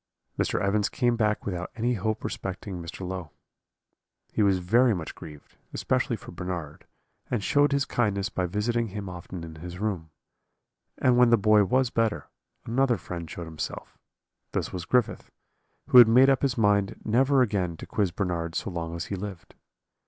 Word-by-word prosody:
"Mr. - - 0
Evans 100 +1 +1
came 120 -4 +1
back 105 -2 0
without 90 -2 -3
any 120 +2 0
hope 110 0 -2
respecting 95 -1 -5
Mr. 85 +2 -7
Low. 90 -4 -5 1.0
He - - +1
was 100 -2 +4
very 115 +6 +3
much 80 -4 -5
grieved, 75 -2 -13 0.2
especially - - 0
for - - -11
Bernard, 85 -5 -6 0.4
and 120 -5 -1
showed 145 +5 +3
his 140 0 +1
kindness 100 -4 0
by 95 -5 -2
visiting 115 +5 0
him 100 -1 -6
often 90 -1 -7
in 80 -1 -9
his 90 +2 -8
room; 95 -6 -3 0.9
and 125 -1 +3
when 125 -1 +6
the 115 - +6
boy 105 0 +5
was 130 +4 +1
better, 115 -2 0 0.4
another 125 0 +2
friend 85 -2 -7
showed 85 +3 -6
himself; 80 -1 -6 0.6
this - - -2
was 90 -2 -4
Griffith, 125 +5 0 0.6
who 125 - +9
had 120 - +10
made 130 +4 +6
up 135 - +1
his 135 -2 0
mind 100 -3 +2
never 130 +4 +4
again 95 -7 -1
to - - -8
quiz 100 -3 0
Bernard 85 -3 -3
so - - -2
long 85 -1 -4
as 85 - -4
he 100 - -4
lived. 95 -3 -8
100 Hz, 175 wpm, -27 LUFS, 90-120 Hz, 1.0 s, had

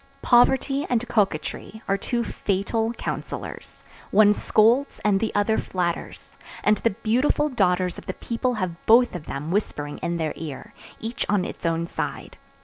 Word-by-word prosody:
Poverty 265 +3 +4
and 245 0 0
coquetry 210 +2 -1
are 195 - +2
two 235 +4 -1
fatal 220 +3 -1
counsellors; - - -6 0.3
one 210 0 +6
scolds 230 +7 +2
and 200 -2 +4
the 225 - -1
other 205 +2 +2
flatters, 175 -2 -3 0.3
and 210 0 +4
the 230 - +1
beautiful 255 +6 +2
daughters 185 -7 +1
of - - -16
the 185 - -3
people 245 +1 -2
have 185 -5 -4
both 240 +2 +6
of 175 -4 -7
them 150 +4 -4
whispering 145 -7 -2
in 170 0 -2
their 160 -2 -1
ear, 165 +7 -8 0.3
each 225 +2 -3
on 200 -3 +2
its - - -4
own 165 0 0
side. - - -5
210 Hz, 155 wpm, -24 LUFS, 180-235 Hz, 0.3 s, one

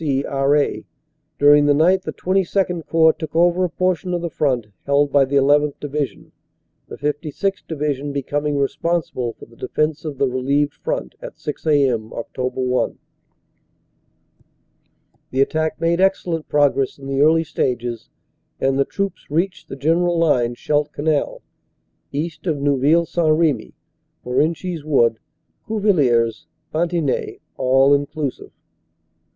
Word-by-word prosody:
C., 140 -2 0
R.A. 140 +1 +1 0.5
During 145 0 +6
the 145 - +4
night 180 +5 +4
the - - -5
XXII 185 -1 0
Corps 160 -1 +4
took 160 -1 -8
over 175 +2 +3
a 180 - +1
portion 180 0 -1
of 175 - -3
the 170 - -3
front 130 -8 0 0.2
held 140 0 +2
by 140 -1 +4
the 140 +1 +2
1 145 +2 +4
1th. 150 -1 -4
Division, 145 -5 -4 0.6
the - - -9
56th. 150 +6 -3
Divi 150 -2 -1
sion 140 +2 -6
becoming 145 +1 -2
responsible 140 -4 -1
for - - -13
the 115 - -20
defense 155 +5 -2
of 150 -4 -5
the 140 0 +2
relieved 140 +3 0
front - - -4
at - - -8
6a.m., 140 -7 0
Oct. 125 +3 -4
1. 125 -1 0 2.3
"The 130 - 0
attack 155 +3 0
made 170 +2 +1
excellent 175 -4 0
progress 140 -2 +2
in 140 - -12
the 135 0 -1
early 160 +2 +4
stages, 120 -6 -3 0.5
and 135 0 +1
the 140 - +3
troops 200 0 -4
reached 175 +6 -1
the - - -6
general 170 +5 +1
line, 125 -8 +2
Scheldt 150 +3 0
Canal 150 0 -1 0.7
(east 160 +5 -4
of 155 -3 +1
Neuville 145 +4 +3
St. 165 -2 +1
Remy) 155 -7 +1 0.5
Morenchies 160 +6 -1
Wood 120 -7 +2 0.5
Cuvillers 140 - +1 0.3
Ban 170 +2 +1
tigny 165 -6 -2 0.2
(all 135 +2 +4
inclusive). 145 -1 -2
145 Hz, 140 wpm, -20 LUFS, 135-165 Hz, 2.3 s, During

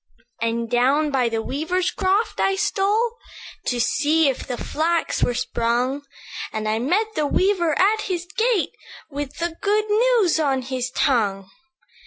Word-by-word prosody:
"And 230 0 -1
down 270 +6 +2
by 255 -3 +2
the 225 -1 -2
weaver's 345 +8 -1
croft 395 +3 0
I 390 - +2
stole, 420 +3 +1 0.5
To 245 - 0
see 295 +5 +3
if 265 - -4
the 245 - -3
flax 330 +2 -1
were 245 - +1
sprung; 250 +2 0 0.5
And 215 0 -3
I 215 +1 0
met 400 - 0
the 300 -6 0
weaver 355 -3 +2
at 430 +3 +3
his 360 -4 -3
gate, 460 -5 +1 0.4
With 285 0 -5
the 335 -1 -3
good 420 +1 +2
news 435 -6 +3
on 270 -4 +1
his 255 0 -3
tongue. 205 -8 0
305 Hz, 150 wpm, -22 LUFS, 250-390 Hz, 0.5 s, see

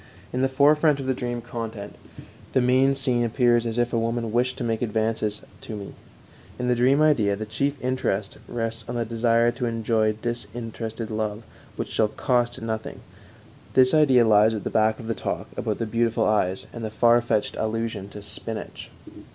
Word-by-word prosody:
In 125 - 0
the 135 - +2
forefront 145 +2 +4
of 135 - -4
the 130 - +1
dream 120 -1 -3
content 115 -4 -6 0.6
the - - +4
main 130 +2 +3
scene 125 -3 +1
appears 120 0 +2
as 115 0 -3
if 120 0 0
a 115 - +2
woman 115 0 -1
wished 125 +2 +1
to 130 - -4
make 115 -2 -1
advances 110 -2 -1 0.2
to 110 - -7
me; 100 -1 -8 0.6
in 125 - -2
the 125 - +3
dream 130 +5 +4
idea 110 -10 +3
the 110 +2 -5
chief 140 +7 -1
interest 110 -6 -1
rests 115 -1 -3
on - - -3
the 120 -1 -1
desire 115 +1 +2
to 120 0 -3
enjoy 110 -1 +1
disinterested 115 0 -5
love 110 0 -3 0.3
which - - -4
shall 110 - +2
"cost 120 0 0
nothing"; 110 -1 -4 0.7
this 130 +1 +5
idea 135 -6 +5
lies 110 +1 +5
at 105 - -5
the - - -3
back 110 0 +2
of 115 - -8
the 115 - -1
talk - - -4
about - - -2
the 115 - -2
beautiful 115 0 +1
eyes 95 -3 +1
and 115 - -7
the 110 - -2
far 120 +2 +4
fetched 110 -3 0
allusion 110 -2 -2
to 105 0 -10
"spinach." 110 +2 -5
115 Hz, 185 wpm, -24 LUFS, 110-125 Hz, 0.7 s, this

